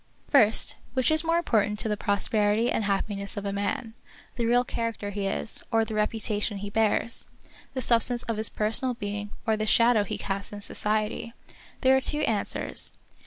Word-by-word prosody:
First, 225 -6 +4 0.2
which 260 +3 +2
is 315 +1 +5
more 330 +1 +2
important 210 -10 +1
to 220 - -1
the 210 - 0
prosperity 205 +3 +1
and 215 - 0
happiness 200 0 -2
of 205 - -4
a 200 - -2
man, 220 +4 -2 0.4
the 235 -3 0
real 245 +1 +4
character 230 -4 -3
he 200 -1 -2
is, 205 +2 -1
or 225 0 +2
the 220 - -6
reputation 210 -1 -1
he 205 +1 -6
bears 220 +1 0 0.2
} - - -25
the 260 - -1
substance 235 +1 +2
of 230 -2 -3
his 220 0 -1
personal 240 +4 0
being, 205 -2 -4 0.2
or 220 - +2
the 215 0 -2
shadow 230 -1 +5
he - - -4
casts 195 0 -4
in 205 - -7
society 215 +2 -2 0.2
} - - -24
There 265 0 +5
are 265 - +3
two 300 +3 +3
answers. 215 -7 -1
215 Hz, 190 wpm, -27 LUFS, 205-235 Hz, 0.4 s, is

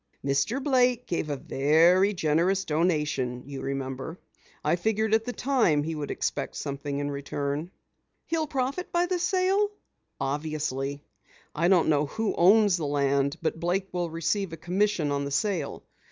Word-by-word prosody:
"Mr. 140 - +1
Blake 250 -3 +2
gave 170 -6 -2
a 145 - -1
very 165 +7 +4
generous 175 +2 +1
donation, 150 -6 0
you 140 -1 -7
remember. 135 +3 -4 0.5
I - - +3
figured 220 +4 0
at 220 0 +3
the 250 - -2
time 240 - +2
he 160 +2 -3
would 150 -2 -4
expect - - -2
something 140 0 -4
in 145 0 -2
return." 140 +3 -3 0.6
"He'll 320 -1 -1
profit 275 +5 -2
by 345 0 +2
the 360 0 -1
sale?" 380 +3 +2 0.5
"Obviously. 145 -1 -2 0.5
I 165 +3 +1
don't 180 -2 +4
know 150 -1 +2
who 220 +6 -2
owns 200 +1 +5
the 155 -4 -2
land, 140 0 +1
but - - -1
Blake 185 +3 -1
will 175 -1 -2
receive 165 +3 -1
a - - -6
commission 180 -2 0
on 140 0 0
the 140 - -3
sale. 185 +5 -1
165 Hz, 155 wpm, -27 LUFS, 145-210 Hz, 0.6 s, owns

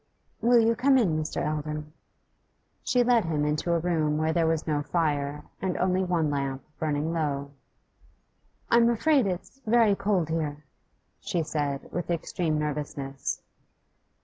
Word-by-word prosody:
'Will 240 +2 +5
you 230 0 +4
come 265 +3 +4
in, 190 -11 +2
Mr. 155 - -3
Eldon?' 150 0 -3 0.9
She 250 -1 +3
led 240 -4 +3
him 150 -3 0
into 150 +3 0
a 170 - +3
room 160 -3 0
where 155 +1 +1
there 165 -1 +2
was 160 -1 0
no 150 -2 0
fire, 145 -2 -1 0.2
and 185 -1 -1
only 185 +1 +1
one 170 -4 +1
lamp 140 -1 -2 0.2
burning 155 +1 -1
low. 140 -3 -2 1.2
'I'm 235 0 +6
afraid 265 +1 +3
it's 185 +8 -5
very 225 -2 +5
cold 195 -5 0
here,' 150 -2 -3 0.5
she 185 -5 -1
said, 145 -3 -3
with 175 0 -4
extreme 170 -1 -1
nervousness. 145 -2 -3
160 Hz, 145 wpm, -27 LUFS, 150-190 Hz, 1.2 s, I'm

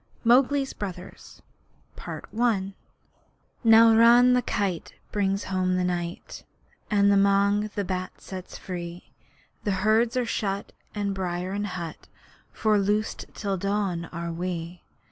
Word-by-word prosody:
MOWGLI'S 270 +3 +3
BROTHERS 185 -3 -8 2.2
Now 225 0 +7
Chil 240 +2 +6
the 250 - +3
Kite 190 -5 -2 0.2
brings 195 -1 0
home 185 -1 0
the 180 - +1
night 175 0 -4 0.5
That 205 -2 +2
Mang 200 +1 +3
the 205 - -1
Bat 185 0 -4
sets 185 -1 -8
free 175 -1 -7 0.5
The - - -1 0.2
herds 225 +3 +3
are 250 - +1
shut 200 -3 -2 0.2
in 200 -1 -1
byre 180 -1 -3
and 205 +1 -2
hut 170 -4 -7 0.4
For 215 -1 +2
loosed 210 +2 -1
till 195 -2 -2
dawn 195 -3 -1
are 170 0 -5
we. 175 0 -5
200 Hz, 120 wpm, -26 LUFS, 180-215 Hz, 2.2 s, Now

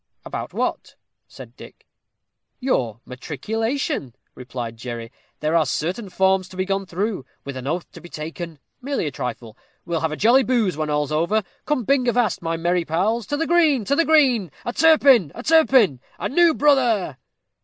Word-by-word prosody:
"About - - -5
what?" - - -3 0.3
asked - - -13
Dick. - - -14 0.7
"Your 120 - -1
matriculation," 160 - -3 0.2
replied 125 -2 -6
Jerry. 115 -1 -7 0.3
"There 155 +2 0
are 165 - +5
certain 180 - -3
forms 190 0 +2
to 185 - -12
be 185 - 0
gone 195 0 -2
through, 190 -2 -2 0.2
with 140 -1 -6
an 130 0 -6
oath 170 +4 -3
to - - -12
be 175 - -12
taken, 165 +1 -7 0.2
merely 275 - -2
a 150 - -2
trifle. 120 -3 -6 0.3
We'll 170 -1 -1
have 160 - -1
a 155 - -4
jolly 240 +5 +5
booze 230 - +1
when 155 0 -3
all's 150 0 -1
over. 170 +8 +1 0.2
Come 295 -5 0
bing 255 +2 +2
avast, 240 -5 +1
my 165 -1 -2
merry 175 +1 0
pals; 200 +8 -1
to 290 - -2
the 325 - 0
green, 315 -9 +3
to 280 - +1
the 335 - +3
green: 265 - +3 0.2
a 240 - -3
Turpin! 275 - +5
a 240 - -7
Turpin! 260 - +4 0.2
a - - -2
new 335 +2 +4
brother!" 240 - +2
190 Hz, 175 wpm, -22 LUFS, 155-250 Hz, 0.7 s, are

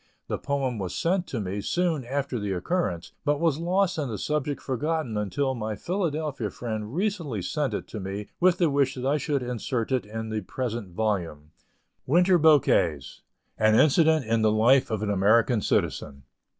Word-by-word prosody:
The - - -2
poem 135 -5 -2
was 95 -2 -4
sent 180 +1 0
to 125 - -4
me 100 0 -3
soon 170 - 0
after 135 -1 -2
the 100 -2 -2
occurrence, 90 - -2
but 145 -1 +1
was 160 -3 +1
lost 180 +1 +1
and 140 -5 -2
the 105 - -3
subject 150 +1 -2
forgotten 145 -2 -2
until 130 +7 -1
my 110 -3 -4
Philadelphia 155 - -2
friend 110 +1 -5
recently 170 - -2
sent 135 - -1
it - - -4
to 110 - -6
me 100 +2 -5
with 180 0 +4
the 170 -4 +2
wish 140 -1 +1
that 125 0 -5
I 140 +3 +2
should 145 -3 -1
insert 125 0 -3
it 130 -5 0
in 110 +1 -5
the 110 -1 -2
present 115 0 -4
volume: 85 -9 -2 0.6
WINTER 175 +4 +4
BOUQUETS. 105 - +3 0.4
AN 110 0 +4
INCIDENT 155 0 +4
IN 115 0 +1
THE 110 -1 +4
LIFE 120 +5 +4
OF 110 -2 -2
AN 105 - 0
AMERICAN 110 +4 +3
CITIZEN. 70 -6 -1
130 Hz, 175 wpm, -26 LUFS, 105-155 Hz, 0.6 s, with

